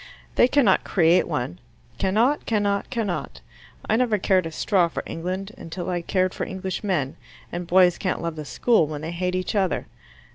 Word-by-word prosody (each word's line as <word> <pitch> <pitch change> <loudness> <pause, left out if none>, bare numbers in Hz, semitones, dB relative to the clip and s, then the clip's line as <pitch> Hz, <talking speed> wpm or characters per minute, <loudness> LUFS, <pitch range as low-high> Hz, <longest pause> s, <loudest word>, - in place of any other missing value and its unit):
They 245 - +5
cannot 255 -8 +3
create 170 -1 +3
one. 125 - -3 0.4
Cannot 230 +10 +2
cannot 205 -2 0
cannot. 220 -8 -3 0.5
I 220 - +3
never 235 -4 +2
cared 185 -3 +2
a - - -7
straw 180 +2 +2
for 170 - -5
England 185 +4 -4
until 175 +2 -5
I 175 -1 -1
cared 185 +1 0
for - - -4
Englishmen, 185 -6 -2 0.3
and 175 0 -4
boys 180 0 +5
can't 185 - -1
love 170 -1 -3
the 155 - -5
school 220 -1 +2
when 150 -1 -5
they 160 +1 -4
hate 180 +1 -2
each 185 -1 -2
other. 195 -4 0
185 Hz, 175 wpm, -24 LUFS, 170-200 Hz, 0.5 s, They